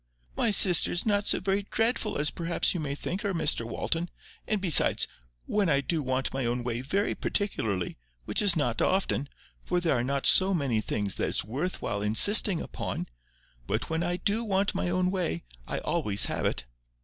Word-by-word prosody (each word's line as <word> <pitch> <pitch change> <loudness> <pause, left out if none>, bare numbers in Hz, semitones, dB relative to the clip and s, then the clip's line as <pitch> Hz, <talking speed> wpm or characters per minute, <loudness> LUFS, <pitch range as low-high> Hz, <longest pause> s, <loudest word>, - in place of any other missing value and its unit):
"My - - +1
sister 185 -4 +7
is 175 - 0
not 205 -1 0
so - - +5
very 195 +1 -1
dreadful 225 -1 -1
as 150 0 0
perhaps 170 0 0
you 150 -6 -4
think 180 +6 -5
her, 200 -3 -3
Mr 150 -8 +1
Walton; 165 +8 -3 0.4
and 215 - 0
besides, 180 -5 +4 0.4
when 205 -4 0
I 140 -2 +2
do 160 +3 -1
want 130 -1 -2
my 135 0 -3
own 120 +1 -2
way 120 0 -3
very 195 +10 -1
particularly, 110 - -2 0.3
which - - 0
is 200 -4 +5
not 125 -7 -1
often, 185 -7 0 0.3
for 180 - -1
there 165 -5 0
are 120 - -1
not 140 +2 -2
so 190 0 +5
many 130 -9 -1
things 100 -2 -2
that - - -1
it's - - -1
worth 145 - -4
while 105 -3 -3
insisting 175 - +4
upon—but - - -7
when 160 +1 -1
I 175 +1 -2
DO 210 +5 -1
want 195 -2 0
my - - -2
own 180 +1 0
way, 180 - -2 0.2
I - - -3
always 100 -1 +1
have - - -2
it. - - -3
165 Hz, 185 wpm, -27 LUFS, 120-195 Hz, 0.4 s, sister